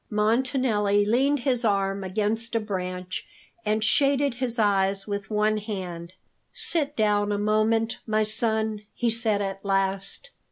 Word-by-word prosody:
Montanelli 215 -2 +2
leaned 265 +6 +2
his 250 -1 0
arm 195 -2 0
against 215 +4 -1
a - - +3
branch, 185 -3 -4 0.4
and 215 0 0
shaded 275 +5 +2
his 245 -1 -2
eyes 195 -2 +2
with 200 -2 -4
one 215 0 +1
hand. 185 -5 -6 0.4
"Sit 295 -3 0
down 210 -2 +2
a 205 - 0
moment, 215 +2 +1
my 215 0 +2
son," 220 0 0
he 235 -1 +1
said 220 -3 +2
at 195 0 -5
last. 195 - -1
215 Hz, 135 wpm, -25 LUFS, 200-230 Hz, 0.4 s, a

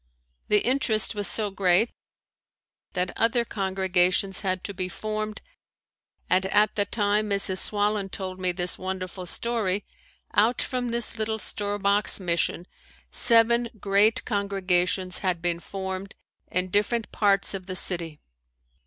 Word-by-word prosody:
The 210 -1 +2
interest 240 -4 +1
was 205 -2 0
so 210 -2 -1
great 190 +3 +2 1.0
that 180 -1 -2
other 235 +1 +1
congregations 190 -2 0
had 185 -2 -2
to 200 - -5
be 185 -1 -3
formed 215 +2 -5 0.8
and 185 +1 +2
at 210 +2 +2
the 205 - +1
time 210 -1 0
Mrs. 195 -2 +1
Swallen 205 -1 0
told 185 -1 -5
me 185 -1 0
this 180 0 -1
wonderful 185 -1 -5
story, 205 -3 -1 0.5
out 225 +4 +3
from 250 -1 -2
this 235 -1 0
little 220 0 -1
store 205 -1 0
box 200 +1 +2
mission 170 -1 -1 0.5
seven 235 0 +5
great 205 +3 +2
congregations 185 -3 0
had 185 -3 -1
been 170 0 -1
formed 190 +1 -6 0.4
in 185 0 0
different 215 +3 0
parts 200 -2 +3
of 190 -1 -6
the 185 - -5
city. 170 -5 -1
200 Hz, 135 wpm, -25 LUFS, 185-215 Hz, 1.0 s, seven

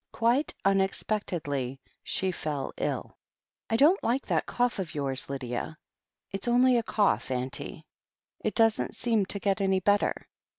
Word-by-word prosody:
Quite 240 +6 +1
unexpectedly 180 -9 0 0.2
she 190 -1 -1
fell 150 -5 -4
ill. - - -3 0.5
1 225 - +2
don't 315 +10 +5
like 255 +4 0
that - - 0
cough 245 -3 0
of 175 -5 -4
yours, 135 -2 +1
Lydia." 135 +2 -4 0.5
It's 195 +4 -5
only 250 +1 +5
a - - 0
cold, 210 -2 +2
auntie." 130 +6 -4 0.5
"It 215 - -2
doesn't 225 -1 +3
seem 225 -5 +1
to 200 - 0
get 200 0 0
any 190 -1 +2
better. 205 +2 +1
195 Hz, 140 wpm, -28 LUFS, 145-225 Hz, 0.5 s, don't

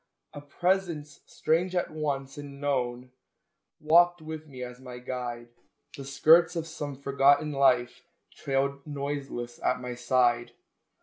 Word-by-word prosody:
A 145 - -8
presence, 165 -1 -1
strange 175 +4 0
at 180 - 0
once 140 -3 -3
and 140 -1 -9
known, 125 -3 -2 0.7
Walked 175 +3 +5
with 155 0 -8
me 130 -3 -8
as 125 0 -8
my 125 -1 -9
guide; 125 -1 -5 0.5
The 140 - -8
skirts 160 +6 +5
of 165 -1 -2
some 150 -3 -6
forgotten 140 +2 +3
life 130 -4 +2 0.3
Trailed 140 +1 -2
noiseless 140 -4 -5
at 125 - +1
my 125 -1 -5
side. 120 -1 +1
140 Hz, 130 wpm, -28 LUFS, 125-155 Hz, 0.7 s, Walked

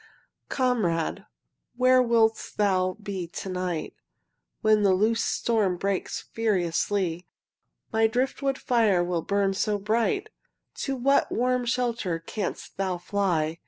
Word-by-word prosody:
Comrade, 215 - 0 0.5
where 255 0 +5
wilt 230 -2 +2
thou 185 -3 +1
be 190 -3 -4
to 185 +3 -7
night 180 -3 -3 0.7
When 215 -1 +4
the 195 -2 +4
loosed 225 +4 +1
storm 210 -6 +1
breaks 195 +1 -2
furiously? 185 -4 0 0.7
My 225 0 +4
driftwood 265 +3 -1
fire 220 -7 +2
will 175 -1 -1
burn 200 +2 +1
so 205 +2 0
bright! 230 - 0 0.5
To 275 - -2
what 275 +2 +2
warm 250 +1 +1
shelter 235 -8 -1
canst 185 +4 -5
thou 190 -2 -1
fly? 175 -4 -1
205 Hz, 120 wpm, -26 LUFS, 185-235 Hz, 0.7 s, where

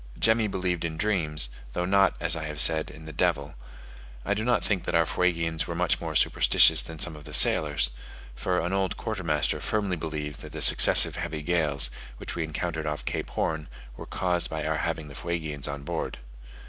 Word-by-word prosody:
Jemmy 110 -1 +2
believed 90 -3 -3
in 80 -1 -4
dreams, 80 - +2 0.2
though 90 - -2
not, 95 +1 +2
as 85 -1 +2
I 80 -2 -5
have 75 -1 -6
said, 80 0 +2
in 80 - -13
the 80 - -9
devil: 75 -3 -1 0.7
I 100 - 0
do 105 +2 -3
not 120 +1 0
think 95 -4 -2
that - - -2
our 85 0 +3
Fuegians 85 -2 -1
were 85 - -5
much 90 0 0
more - - -5
superstitious - - +5
than 80 - -7
some 80 0 +2
of 75 -1 -13
the - - 0
sailors; - - +4 0.4
for 90 +8 -2
an 85 +3 -3
old 95 -1 -1
quartermaster - - -2
firmly 100 -4 -2
believed 75 -2 -6
that - - -11
the - - -6
successive - - +7
heavy 75 -1 -5
gales, 75 -7 +2 0.3
which - - -7
we 85 - -2
encountered 80 0 -4
off 75 0 -5
Cape - - -4
Horn, 80 -2 -3 0.3
were - - -10
caused 90 -2 -2
by 80 -1 -5
our 80 0 -1
having 80 -1 -4
the 70 - -12
Fuegians 80 -2 -4
on 70 0 -6
board. - - -5
80 Hz, 200 wpm, -26 LUFS, 75-90 Hz, 0.7 s, successive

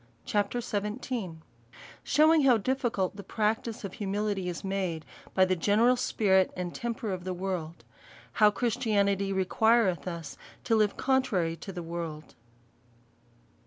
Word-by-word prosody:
CHAPTER 205 +4 0
XVH, 210 -3 -3 0.7
Shewi7ig 310 +1 +4
how 255 -4 +6
difficult 225 -5 -1
the 200 - -7
practice 220 +3 -1
of 195 -2 -5
Humility 205 -2 -2
is 175 - -6
made, 190 -5 -2 0.3
by 190 - +5
the 185 0 +1
general 215 +8 +3
spirit 190 -6 +2
and 180 -1 -4
temper 230 -3 -3
of 185 -2 -4
the 185 0 -3
ivorld. 180 -3 -4 0.5
How 210 -1 +5
Christianity/ 205 -4 0
requireth 195 0 +2
us 170 -4 -6 0.3
to 225 - +2
live 210 -2 +2
con 265 0 +3
trary 170 - -1
to 195 - -7
the 175 -2 -6
icorld. 165 -2 -6
200 Hz, 135 wpm, -29 LUFS, 180-225 Hz, 0.7 s, how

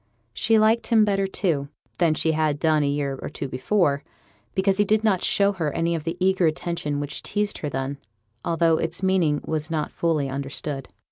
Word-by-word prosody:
She 225 - +3
liked 220 +2 +3
him 220 -3 +5
better, 195 -1 +1
too, 160 -8 -1 0.3
than 165 -3 +3
she 160 - +1
had 155 -2 +1
done 155 0 +2
a 145 - +1
year 140 -1 -1
or - - -5
two 140 - -5
before, 140 +2 +1 0.5
because 190 +1 +2
he - - +6
did 215 +2 +2
not 195 -5 +2
show 200 0 +3
her 165 -7 -2
any 170 +1 0
of 165 -2 -3
the 165 +1 -3
eager 185 -2 +3
attention 155 -2 -2
which 145 +1 -4
teased 205 0 -2
her 150 - -3
then, 135 +1 -3 0.4
although 165 -1 +2
its 170 +3 -3
meaning 175 -6 +2
was 155 0 -2
not 155 -2 -2
fully 160 -4 0
understood. 135 0 -4
165 Hz, 195 wpm, -24 LUFS, 145-190 Hz, 0.5 s, he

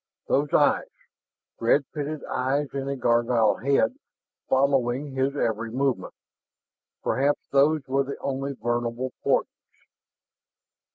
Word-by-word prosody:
Those 145 +1 +1
eyes - - +3 0.7
red 120 +5 +3
pitted 150 0 -4
eyes 135 +3 -1
in 140 0 -3
a 140 - -1
gargoyle 120 -3 +2
head 195 - +1 0.5
following 135 0 +2
his 135 +1 0
every 115 -4 -1
movement 130 -5 -1 0.9
perhaps 140 +2 0
those 145 +1 +3
were 135 +1 +1
the 140 - -5
only 135 +1 -3
vulnerable 120 +1 -2
points. - - +2
135 Hz, 110 wpm, -25 LUFS, 120-140 Hz, 0.9 s, eyes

